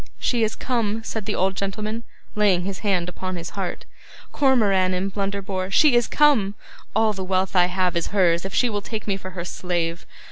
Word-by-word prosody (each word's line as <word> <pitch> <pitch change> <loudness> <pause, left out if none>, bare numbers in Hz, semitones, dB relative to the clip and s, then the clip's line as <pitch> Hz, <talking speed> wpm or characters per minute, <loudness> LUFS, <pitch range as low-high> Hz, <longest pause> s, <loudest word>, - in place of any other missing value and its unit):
'She 240 -2 0
is 220 - 0
come!' 225 -3 -1
said 220 -3 -5
the - - -1
old 190 +1 +1
gentleman, 215 +3 -3 0.3
laying 200 -4 +3
his 190 -1 -4
hand 190 -5 0
upon 185 +1 -5
his 170 -1 -6
heart. 190 -3 -4 0.5
'Cormoran 200 -9 +3
and 190 +2 -2
Blunderbore! 195 -2 -2
She 290 +8 +5
is 240 -2 +3
come! 245 -10 +3 0.4
All 220 0 +3
the 190 -1 -5
wealth 190 +1 0
I 180 -1 +5
have 180 -1 0
is 170 - 0
hers 175 -4 +2
if 195 - -5
she 250 - +3
will 205 -3 -2
take 215 +1 -5
me 200 - 0
for 185 -1 -7
her 170 - -3
slave. 175 -1 -3
195 Hz, 200 wpm, -23 LUFS, 185-215 Hz, 0.5 s, She